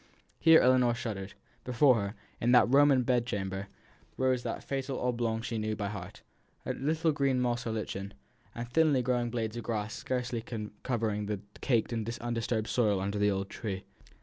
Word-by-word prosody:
Here 160 0 +7
Ellinor 125 -2 +4
shuddered. 105 -5 -5 0.3
Before 125 +2 +4
her, 100 +2 -4 0.2
in 120 +2 +2
that 125 - +7
Roman 140 -2 +6
bed 125 -1 +2
chamber, 95 -2 -3 0.5
rose 130 -1 +2
the - - -2
fatal 135 -1 -3
oblong 115 -2 -1
she 115 -2 -2
knew 110 0 -1
by 100 -1 -3
heart 105 0 -8 0.4
a - - -1
little 160 +3 +1
green 140 -3 +1
moss 120 0 0
or - - -1
lichen, 100 -3 -4 0.4
and 120 0 -4
thinly 145 0 +3
growing 120 -1 0
blades 115 -1 -3
of 120 - -5
grass 110 -2 -2
scarcely 125 -2 -3 0.4
covering 110 -4 -1
the 105 -2 -2 0.2
caked 120 -3 +1
and 115 -1 -2
undisturbed 115 -2 -1
soil 105 -5 +2
under 100 +2 -2
the 105 0 +3
old 95 0 -2
tree. 100 -4 -4
120 Hz, 175 wpm, -30 LUFS, 105-125 Hz, 0.5 s, Here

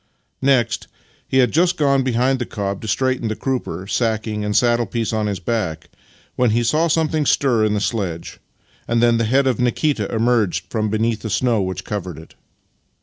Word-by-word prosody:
Next, 130 -4 +1 0.4
he 130 - 0
had 125 -3 +4
just 175 +3 +2
gone 140 -2 +3
behind 130 +1 +1
the 120 - -2
cob 100 -2 -4
to 110 - -6
straighten 130 +2 0
the 110 - -2
crupper, 130 -8 -3
sacking 110 -1 -1
and 105 0 0
saddle 120 -1 +2
piece 115 +3 -2
on 110 -1 0
his 100 -3 -3
back, 90 -6 -3 0.4
when 125 -1 +2
he 115 +2 +1
saw 155 +8 +2
something 160 -1 +1
stir 130 -5 +2
in 105 -1 +1
the - - 0
sledge, 95 -8 -3 0.5
and 115 0 +1
then 120 0 +3
the 115 - +1
head 135 +5 +2
of 130 -3 +1
Nikita 125 -2 0
emerge 110 -7 +1
from 110 -2 -1
beneath 110 +1 0
the 110 - -5
snow 115 0 +1
which 95 0 -4
covered 95 -5 -5
it. 80 +1 -13
115 Hz, 190 wpm, -20 LUFS, 105-130 Hz, 0.5 s, had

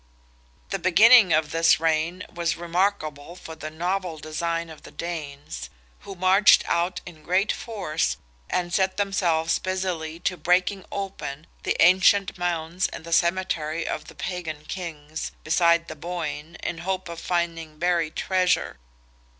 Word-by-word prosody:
The 195 - -1
beginning 200 +3 +7
of 155 -1 +2
this 165 -1 +4
reign 165 +3 0
was 170 -1 -1
remarkable 170 -3 -1
for 165 - -9
the 155 -1 -7
novel 175 +1 -2
design 165 +2 -3
of 155 - -12
the - - -12
Danes, 145 - -6 0.3
who 195 - -9
marched 190 +3 +5
out 175 +1 0
in 165 -3 -11
great 185 +6 +1
force, 180 -9 -2 0.3
and 175 -1 -1
set 190 0 +1
themselves 175 -5 +1
busily 180 -4 -3
to 180 - -1
breaking 180 +4 +1
open 190 -7 -5 0.2
the - - -1
ancient 185 +3 +5
mounds 175 +1 -1
in - - -9
the 170 0 -4
cemetery 170 -3 +1
of 150 - -3
the - - -13
Pagan 160 -4 -5
kings, 160 -4 -6
beside 170 +1 +3
the - - -7
Boyne, 165 -1 -5
in 165 - -3
hope 185 +1 -3
of 170 -1 -7
finding 165 -3 -2
buried 170 -2 0
treasure. 185 - +1
170 Hz, 140 wpm, -25 LUFS, 160-185 Hz, 0.3 s, beginning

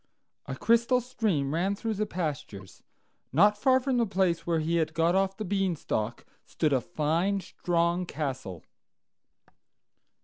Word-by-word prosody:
A 135 - -4
crystal 235 - +3
stream 210 - -1
ran 185 +5 0
through 225 +2 -3
the 210 +1 -2
pastures; 140 - -5 0.5
not 205 +9 +5
far 260 +4 +3
from 260 -1 0
the 235 -2 +2
place 185 -3 0
where 170 -1 +2
he 160 +2 0
had 155 -1 -1
got 165 +2 +3
off 195 0 +1
the 215 - -4
Beanstalk 175 - -2 0.2
stood 155 -3 -1
a 130 - +2
fine, 170 +7 0
strong 175 -1 -1
castle. 135 - -5
175 Hz, 140 wpm, -28 LUFS, 155-205 Hz, 0.5 s, not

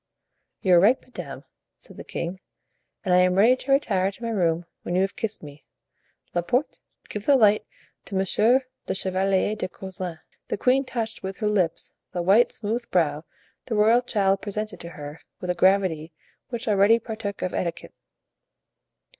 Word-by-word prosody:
"You 185 - +4
are 175 - +8
right, 220 +8 +5
madame," 255 - -9 0.3
said - - -12
the - - -7
king, 175 +3 -5 0.7
"and 180 - +2
I 180 - +6
am 180 0 +3
ready 225 +6 +6
to 270 - -4
retire 195 -9 +2
to 235 - -14
my 230 - -2
room 170 -5 +1 0.2
when 175 - -3
you 185 - +3
have 195 +1 -1
kissed 215 -4 -4
me. 145 -1 -11 0.7
Laporte, 245 - 0 0.3
give 210 -1 -6
the 285 - +6
light 215 -4 +4 0.4
to 195 - -6
Monsieur 215 +7 +3 0.3
the - - -1
Chevalier 190 +2 +1
de 210 - -3
Coislin." 185 -3 -6 0.3
The - - -2
queen 260 +5 +3
touched 225 -3 -4
with 190 0 -5
her 215 - -1
lips 185 -6 0 0.2
the 175 -1 -2
white, 200 +7 +5
smooth 230 +3 -3
brow 155 -3 +1 0.4
the 230 - -2
royal 220 +3 +5
child 195 -5 +1
presented 210 -2 -4
to 170 - -8
her 150 -1 -9 0.2
with 180 -1 -2
a - - 0
gravity 175 -4 +2 0.4
which 235 -1 -5
already 205 +2 +5
partook 220 -3 -5
of 185 - -2
etiquette. 170 -2 -3
195 Hz, 170 wpm, -25 LUFS, 180-225 Hz, 0.7 s, are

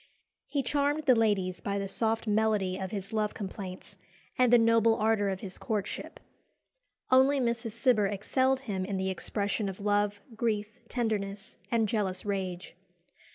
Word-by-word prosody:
"He 280 -2 -1
charmed 290 +3 +1
the 260 - +7
ladies 205 -5 +1
by 200 0 -2
the 200 0 -2
soft 225 +3 -1
melody 210 -3 +1
of 190 0 -4
his 200 0 -6
love 215 -1 0
complaints 195 -1 -7 0.4
and 250 -2 +3
the 245 - +8
noble 230 -1 +4
ardour 215 -2 +2
of 190 -1 -3
his 190 -2 -8
courtship." 215 -5 -4 0.9
Only 265 +2 +5
Mrs. 235 -2 -1
Cibber 230 -3 +3
excelled 260 +7 +1
him 200 -8 -3
in 195 +1 -2
the 190 0 -1
expression 200 +2 -2
of 190 - -8
love, 205 0 +1 0.2
grief, 215 -2 -2
tenderness, 205 -4 -3
and 230 -2 +2
jealous 195 -3 -1
rage. 190 -3 -3
210 Hz, 155 wpm, -29 LUFS, 195-230 Hz, 0.9 s, the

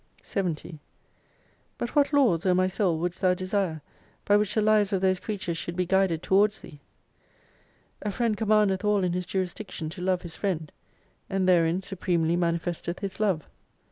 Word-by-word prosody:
51 185 -5 -1
70 155 +1 -11 1.0
But 240 - -4
what 290 -1 +4
laws 240 - +3
O 180 - +4
my 185 0 +3
Soul 185 -2 0
wouldst 175 +2 -3
thou 185 -1 +3
desire, 185 -4 -2 0.4
by 205 - +4
which 205 -1 +1
the - - +3
lives 210 -2 +3
of 195 - +1
those 185 -1 +2
creatures 185 -6 -4
should 170 - -5
be 180 0 0
guided 190 -3 +1
towards 205 +2 +3
Thee? 145 - -12 1.2
A 210 - -2
friend 225 +1 0
commandeth 210 -2 +2
all 210 -2 +2
in 180 -1 0
his 180 -1 -3
juris 185 -2 -1
diction 165 -7 -6
to 180 +2 -8
love 185 0 0
his 170 -2 -7
friend; 165 -6 -2 0.6
and 190 -1 0
therein 175 0 +3
supremely 170 -4 0
manifesteth 170 0 -1
his 195 -1 -6
love. 190 -8 0
185 Hz, 175 wpm, -27 LUFS, 170-205 Hz, 1.2 s, what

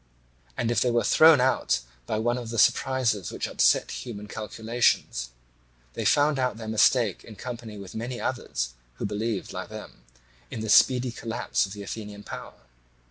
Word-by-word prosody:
And 115 - 0
if 120 -2 +2
they 125 - +3
were 120 0 +2
thrown 160 -3 +7
out 130 - +2 0.3
by 110 - -1
one 120 +3 0
of 120 -2 -7
the 115 - -4
surprises 115 -4 +2
which - - -3
upset - - +3
human 105 -4 -7
calculations, 110 - -1 0.6
they - - -4
found 145 -1 +3
out 125 -4 0
their 110 -1 -7
mistake 110 -1 +3
in 110 - -12
company 115 -1 -7
with 100 -2 -9
many 120 +2 -4
others - - -3 0.2
who - - -4
believed, 105 0 -3
like - - -6
them, - - -10 0.5
in 110 - -5
the 110 - -4
speedy 125 +2 +5
collapse 115 -3 -1
of 95 - -9
the 100 -1 -7
Athenian 105 0 -7
power. - - -9
115 Hz, 170 wpm, -26 LUFS, 105-125 Hz, 0.6 s, thrown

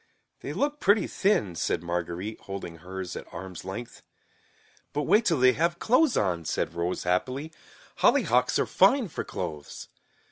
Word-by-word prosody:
"They - - -6
look 295 +1 -1
pretty 205 -2 +4
thin," 190 - +1
said 85 - -1
Marguerite 90 +4 -3
holding 95 -4 -7
hers 90 +2 -6
at - - -8
arms 95 -3 -8
length. 105 +6 -7 0.9
"But 150 +1 0
wait 215 - +4
till 165 -8 +2
they 130 0 +6
have 170 +2 0
clothes 255 - +3
on," 90 -4 0
said 80 - -2
Rose 85 +1 -2
happily. 130 - -1 0.4
"Hollyhocks - - +3
are - - +2
fine 260 -8 +4
for - - -4
clothes." 75 -2 -6
105 Hz, 150 wpm, -27 LUFS, -, 0.9 s, they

